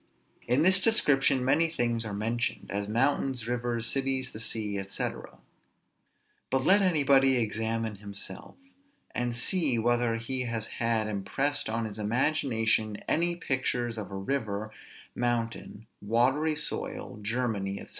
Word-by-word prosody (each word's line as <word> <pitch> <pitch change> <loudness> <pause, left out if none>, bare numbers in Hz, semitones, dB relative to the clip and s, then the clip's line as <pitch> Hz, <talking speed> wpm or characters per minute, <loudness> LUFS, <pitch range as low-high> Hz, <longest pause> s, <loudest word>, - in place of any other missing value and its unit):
In 125 +5 +3
this 185 +2 +6
description 140 - +3
many 160 +5 +3
things 120 -6 -1
are 105 - -4
mentioned, 115 +3 -2
as 100 0 -2
mountains, 130 +1 0
rivers, 120 -1 -1
cities, 135 +1 0
the 110 - -8
sea, 105 -3 -1
&c. 100 +1 -2 1.4
But 130 0 0
let 200 +2 +6
anybody 140 -7 +4
examine 110 -1 -1
himself, 100 -1 -8 0.6
and 120 -1 -1
see 140 +1 +2
whether 120 0 +2
he 125 +3 -2
has 115 -2 -2 0.2
had 115 -2 +1
impressed 135 +9 -1
on 115 +1 -1
his 110 -1 -6
imagination 110 -2 +1
any 170 +2 +1
pictures 125 -6 -1
of 110 -3 -6
a 100 - -7
river, 105 0 -2 0.4
mountain, 115 -2 -2 0.2
watery 130 +9 +2
soil, 150 -7 -3
Germany, 105 -3 -2
&c. - - -10
120 Hz, 130 wpm, -29 LUFS, 110-135 Hz, 1.4 s, this